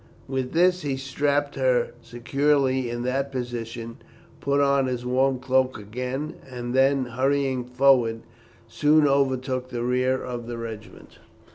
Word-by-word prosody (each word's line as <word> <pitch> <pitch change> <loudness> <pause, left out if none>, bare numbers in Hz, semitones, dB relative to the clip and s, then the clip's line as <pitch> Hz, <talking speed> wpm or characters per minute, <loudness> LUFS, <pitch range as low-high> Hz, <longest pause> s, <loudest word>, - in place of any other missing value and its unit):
With 130 -1 -3
this 180 +2 +3
he 140 -4 -2
strapped 140 +2 0
her 130 -3 +1
securely 130 +1 0
in 120 0 -4
that 135 +2 -1
position, 115 -2 -5 0.4
put 140 +1 +1
on 140 -1 +3
his 125 -1 -3
warm 130 +1 +2
cloak 130 0 +1
again, 125 +8 -5
and 120 -1 -5
then, 135 0 +3
hurrying 130 +1 0
forward, 125 -3 +3 0.5
soon 150 +5 +3
overtook 130 -2 0
the 120 -2 -3
rear 130 +1 +1
of 120 -2 -6
his 120 - -4
regiment. 110 -2 -9
130 Hz, 135 wpm, -25 LUFS, 120-140 Hz, 0.5 s, this